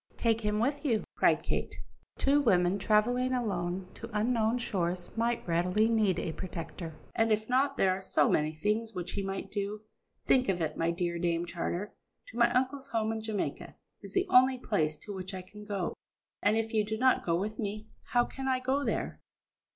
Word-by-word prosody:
"Take 230 -1 +2
him 210 -1 0
with 280 +6 0
you," 230 -7 +1
cried - - +3
Kate. - - -2 0.4
"Two 285 +2 +3
women 185 -5 +3
travelling 235 +5 +2 0.6
to 230 - -8
unknown 230 +1 +2
shores 180 -6 -2
might 230 -1 0
readily 180 +6 +2
need 215 -6 +2
a 170 - -2
protector, 165 -1 -6 0.2
and 225 0 +2
if 215 0 +1
not, 275 +2 +2
there 190 - +4
are 185 +1 -2
so 155 -6 +2
many 150 0 +2
things 210 +8 -1
which 180 -1 -4
he 200 - -2
might 195 0 -4
do. 205 +1 -3 0.4
Think 255 -3 +4
of 185 -2 +1
it, 160 -2 -1
my 165 - 0
dear 170 0 -1
Dame 170 0 0
Charter; 175 +3 -3 0.4
to 230 - -10
my 235 0 +5
uncle's 260 +2 0
home 220 -1 0
in 225 0 -3
Jamaica 215 -2 -3 0.3
is - - -9
the 380 0 +3
only 255 +1 +6
place 155 -11 0
to 205 - -8
which 190 0 -5
I 185 - -6
can 210 +3 -12
go, 200 -4 -2 0.5
and 210 +2 +3
if 225 0 -1
you 215 -1 +3
do 215 +1 -3
not 255 +2 +3
go 170 - +1
with 215 +3 -4
me, 210 0 -4 0.2
how 240 0 +2
can 270 0 -6
I 260 -1 +2
go 265 +3 0
there?" - - -2
215 Hz, 195 wpm, -30 LUFS, 185-240 Hz, 0.6 s, only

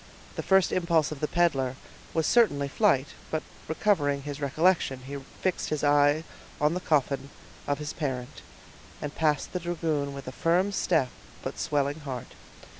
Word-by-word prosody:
The - - -2
first 190 -2 +4
impulse 170 -4 +2
of 150 - -5
the 150 - 0
peddler 135 -8 +1 0.4
was 160 -1 +1
certainly 145 -13 +4
flight; 145 -4 +2 0.2
but 155 - -1 0.2
recovering 150 -5 +1
his 145 0 -6
recollection, 145 -1 +2
he 140 +1 -5 0.2
fixed 185 -2 0
his 155 -1 -2
eye 145 +1 +4 0.4
on 150 +2 +3
the 180 - -1
coffin 140 -5 +1 0.4
of 145 - +1
his 150 +1 -5
parent, 130 -5 -4 0.6
and 145 0 -5
passed 150 -3 0
the 180 - -1
dragoon 160 -5 -1
with 140 -2 -8
a - - -3
firm 175 +8 +2
step 160 -9 +2 0.3
but - - -5
swelling 145 0 0
heart. 130 -5 -6
150 Hz, 160 wpm, -28 LUFS, 140-170 Hz, 0.6 s, first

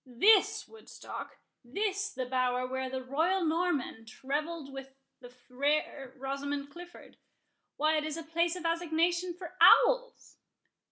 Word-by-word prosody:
—This 370 - +3
Woodstock!—this 410 - -6
the 260 -9 -4
bower 250 0 0
where 260 0 -3
the 260 0 -4
royal 330 +8 0
Norman 315 -9 -1 0.2
revelled 295 +1 -3
with 270 0 -9 0.2
the 245 -2 -12
fair 270 +2 -2
Rosamond 280 +1 -4
Clifford!—Why, 315 -2 -5
it 305 - -1
is 310 0 -4
a 330 - -6
place 335 +2 0
of 355 -2 -7
assignation 340 +1 0
for 355 0 -10
owls." - - +5
305 Hz, 120 wpm, -30 LUFS, 265-345 Hz, 0.2 s, owls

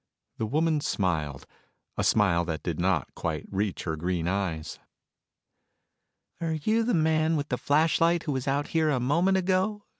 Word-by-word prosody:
The 110 - -2
woman 155 +4 +1
smiled 80 - -1 0.5
a - - -1
smile 95 -5 +3
that 80 -3 -4
did 85 -2 -3
not 90 -5 0
quite 80 -3 -3
reach 100 0 -2
her 80 -2 -2
green 85 +1 -2
eyes. 90 -5 -2 1.6
"Are 165 -1 -1
you 215 +9 +1
the 230 0 +1
man 160 0 +2
with 145 0 -3
the 125 - 0
flashlight 165 +3 +2
who 150 - -2
was 130 -1 -3
out 140 +2 0
here 160 -1 +2
a 135 -4 +1
moment 170 +10 +2
ago?" 190 +3 0
135 Hz, 160 wpm, -27 LUFS, -, 1.6 s, smile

